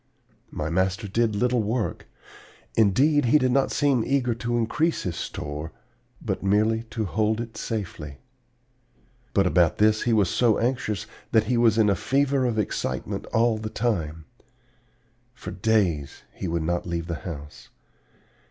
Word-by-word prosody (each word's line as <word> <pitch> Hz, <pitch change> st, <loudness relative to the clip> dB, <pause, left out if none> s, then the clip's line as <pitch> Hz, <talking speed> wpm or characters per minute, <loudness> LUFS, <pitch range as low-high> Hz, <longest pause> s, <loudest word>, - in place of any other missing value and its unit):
My 80 Hz, +1 st, -4 dB
master 95 Hz, +4 st, 0 dB
did 110 Hz, +2 st, +1 dB
little 125 Hz, +2 st, +2 dB
work; 110 Hz, +2 st, -2 dB, 0.7 s
indeed, 130 Hz, +8 st, +4 dB
he 120 Hz, +6 st, +5 dB
did 130 Hz, -3 st, +1 dB
not 135 Hz, +1 st, +2 dB
seem 140 Hz, -5 st, +2 dB
eager 125 Hz, -2 st, +1 dB
to 120 Hz, +1 st, -2 dB
increase 150 Hz, +8 st, 0 dB
his 90 Hz, -3 st, -3 dB
store, 75 Hz, +1 st, -5 dB, 0.5 s
but -, -, -3 dB
merely 110 Hz, +3 st, +2 dB
to 110 Hz, -2 st, -2 dB
hold 110 Hz, +3 st, 0 dB
it 115 Hz, -1 st, -6 dB
safely. 85 Hz, -10 st, -5 dB, 1.2 s
But 100 Hz, -, +4 dB
about 90 Hz, -2 st, +3 dB
this 110 Hz, +1 st, +3 dB
he 120 Hz, -, +1 dB
was 105 Hz, -4 st, +3 dB
so 115 Hz, -4 st, +3 dB
anxious 115 Hz, -4 st, -1 dB, 0.3 s
that 110 Hz, -2 st, +4 dB
he 120 Hz, +3 st, 0 dB
was 115 Hz, -2 st, +4 dB
in 110 Hz, -2 st, +4 dB
a 100 Hz, -, +3 dB
fever 135 Hz, +5 st, +1 dB
of 115 Hz, -2 st, -2 dB
excitement 105 Hz, -, -2 dB
all 115 Hz, -1 st, +2 dB
the 110 Hz, 0 st, -4 dB
time. 80 Hz, -10 st, -2 dB, 1.1 s
For -, -, -8 dB
days 95 Hz, -, 0 dB
he 95 Hz, -, -5 dB
would 85 Hz, -1 st, -1 dB
not 85 Hz, +2 st, -1 dB
leave 85 Hz, -1 st, -2 dB
the 85 Hz, 0 st, -3 dB
house. 75 Hz, -4 st, -8 dB
110 Hz, 150 wpm, -25 LUFS, 90-120 Hz, 1.2 s, he